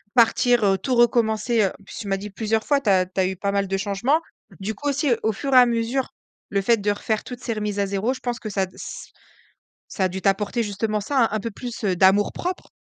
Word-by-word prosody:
partir, 240 0 +4
heu, 195 -1 +3
tout 250 +7 -1
recommencer, 230 -1 +3
heu. - - +3
En 200 - -19
plus - - -12
tu 205 - -6
m'as 195 - 0
dit 205 +2 -7
plusieurs 220 +2 -1
fois 285 -1 +2
tu 215 - 0
as 185 -2 +4
tu 185 +1 -6
as 185 - +2
eu 190 - -3
pas 200 +2 -2
mal 200 0 0
de 195 +1 -1
changements. 210 +10 +1 0.4
Du 210 +3 -3
coup 290 +7 -3
aussi, 285 0 0
heu, 230 - +2
au 220 - +2
fur 275 +5 -3
et - - +9
à 250 - +9
mesure, 240 +2 -1 0.4
le 200 -1 0
fait 230 +4 +3
de 205 0 0
refaire 215 +1 -2
toutes 250 -1 -8
ces 235 - -2
remises 210 -1 -3
à 200 - +1
0 200 +6 0
je 260 - -9
pense 245 0 -3
que 215 - -6
ça 195 -1 -1
a - - +2
d 185 - -19
ç - - -8 0.8
ça 190 - -2
a 185 - +3
dû 190 +1 -6
t'apporter 205 +4 +1
justement 210 +1 -2
ça, 280 +7 -3
hein, - - +1
un 215 - -1
peu - - -1
plus, 240 +1 -7
heu, 190 -2 +2
d'amour 195 +3 +4
propre. 360 +1 -4
215 Hz, 275 wpm, -23 LUFS, 195-240 Hz, 0.8 s, et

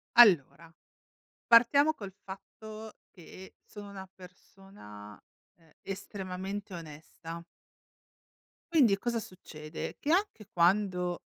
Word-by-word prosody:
Allora, 170 - +6 0.8
partiamo 280 +6 +6
col 200 -6 -8
fatto 215 +3 -10
che 185 +1 -13
sono 205 -1 -10
una 190 -1 -9
persona, 180 - -13 0.4
ehm, 165 -2 -26
estremamente 195 0 -6
onesta. 165 +1 -9 1.3
Quindi 245 -11 +5
cosa 235 +3 -1
succede? 155 -6 -8
Che 305 - +1
anche 375 - 0
quando, 180 0 +2
195 Hz, 90 wpm, -31 LUFS, 170-215 Hz, 1.3 s, Allora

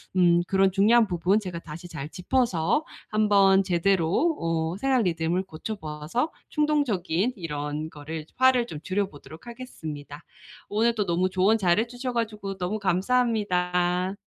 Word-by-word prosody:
음 175 -2 +4
그런 195 0 +3
중요한 220 +4 +4
부분 180 +3 +1
제가 185 -5 -6
다시 165 +2 -9
잘 150 -4 -6
짚어서 200 - 0 0.2
한번 200 -2 +4
제대로 190 - +1
어 165 +1 -1
생활 265 +2 +2
리듬을 170 0 0
고쳐 190 +4 -6
보아서 160 - -3 0.2
충동적인 250 - 0
이런 150 -3 -4
거를 155 +1 -7
화를 255 -2 +4
좀 155 - -7
줄여보도록 185 - -4
하겠습니다. 155 - -8 0.5
오늘 225 +3 +2
또 210 -3 -1
너무 175 +2 +1
조언 190 +4 +3
잘해 200 +3 +2
주셔 245 +1 -5
가지고 210 -4 -3
너무 185 +4 -2
감사합니다. 185 -3 +1
190 Hz, 310 characters per minute, -26 LUFS, 165-225 Hz, 0.5 s, 음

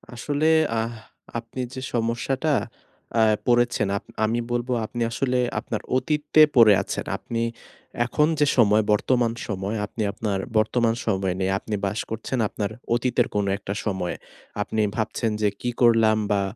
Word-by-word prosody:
আসলে 145 +5 -1 0.3
আহ 115 +1 -2 0.5
আপনি 115 +2 -7
যে 130 - -6
সমস্যাটা 120 +6 0 0.7
আ - - +5 0.3
পড়েছেন, 120 -3 +3
আপ - - -8 0.2
আমি 115 +2 0
বলব 120 +1 -1 0.2
আপনি 120 +2 -5
আসলে 125 +1 0 0.2
আপনার - - -4 0.2
অতীতে 150 +3 +2
পড়ে 110 -4 +8
আছেন। - - -4
আপনি 115 -1 -4 0.6
এখন 150 +4 +2
যে 150 - +5
সময়, 110 -2 +5
বর্তমান 120 +1 +1
সময়, 100 +1 -3
আপনি 110 +2 -4
আপনার 100 -2 -2 0.2
বর্তমান 115 +1 +2
সময়ে 95 -4 0
নেই। 95 - +1
আপনি 105 0 -4
বাস 100 +3 -2
করছেন 115 +3 -3
আপনার 105 0 -3 0.2
অতীতের 120 0 +1
কোন 105 -1 +1
একটা 100 0 -5
সময়ে। 95 -4 -2 0.5
আপনি 110 +1 -1
ভাবছেন 110 0 -1
যে 105 - +3
কি 125 - -1
করলাম 115 -2 +5
বা 100 - +2
115 Hz, 150 wpm, -24 LUFS, 105-125 Hz, 0.7 s, পড়ে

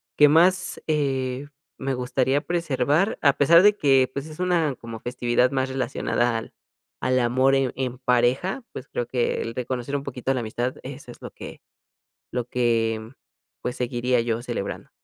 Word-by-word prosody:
que 150 0 +7
más, 180 +4 +3
eh, 135 -3 -1 0.3
me 135 0 -2
gustaría 130 +2 +1
preservar, 160 - 0
a 140 -3 +5
pesar 165 +5 +6
de 205 +1 +6
que 135 -7 +3
pues 140 +2 -4
es 155 +1 -11
una 170 -6 +1
como 115 -2 -9
festividad 125 +1 +1
más 130 -1 0
relacionada 120 -2 0
al 115 - -7 0.5
al 130 0 +2
amor 130 +3 +3
en 135 -2 +1
en 130 -2 -3
pareja 125 - +1
pues - - -8
creo 120 - -3
que 120 0 -1
el 115 - -4
reconocer 125 +3 -3
un 140 - -6
poquito 135 -1 -2
la 130 - -1
amistad 120 +2 -3
eso 130 -1 -9
es - - -15
lo - - -7
que - - -10 0.7
lo 125 -1 -2
que 115 -2 +1 0.6
pues 125 - -2
seguiría 125 0 0
yo 115 0 -1
celebrando. 120 -5 -5
130 Hz, 170 wpm, -24 LUFS, 120-140 Hz, 0.7 s, que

